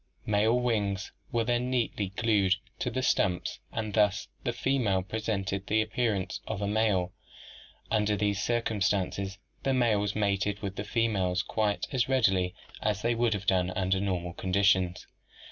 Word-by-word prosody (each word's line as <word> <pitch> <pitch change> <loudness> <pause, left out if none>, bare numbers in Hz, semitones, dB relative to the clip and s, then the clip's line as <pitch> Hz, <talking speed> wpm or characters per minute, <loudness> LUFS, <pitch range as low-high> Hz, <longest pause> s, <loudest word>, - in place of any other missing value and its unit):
Male 110 +3 +3
wings 105 -5 -1 0.2
were 115 -1 +1
then 120 +2 0
neatly 115 -6 0
glued 105 -4 +3 0.2
to - - -1
the 130 +2 -2
stumps 90 -7 +1
and 110 -2 -3
thus 105 - +2
the - - 0
female 115 -9 +1
presented 100 -2 -2
the 110 +1 +3
appearance 110 -3 -1
of 110 - -3
a 100 - -1
male. 100 -4 +1 0.8
Under 105 -1 +2
these 100 0 0
cir 120 0 +1
cumstances 100 -2 -1 0.2
the 135 -1 +1
males 105 -5 +2
mated 100 -1 0
with 100 -1 -3
the 100 - -3
females 100 -6 +1
quite 105 +1 0
as 130 -1 +1
readily 95 -9 +2 0.3
as 105 -1 -1
they 120 +1 +2
would 115 -1 +2
have 100 0 -5
done 90 -1 +2
under 95 0 +1
normal 90 -3 -2
conditions. 95 0 +2
105 Hz, 155 wpm, -29 LUFS, 95-115 Hz, 0.8 s, Male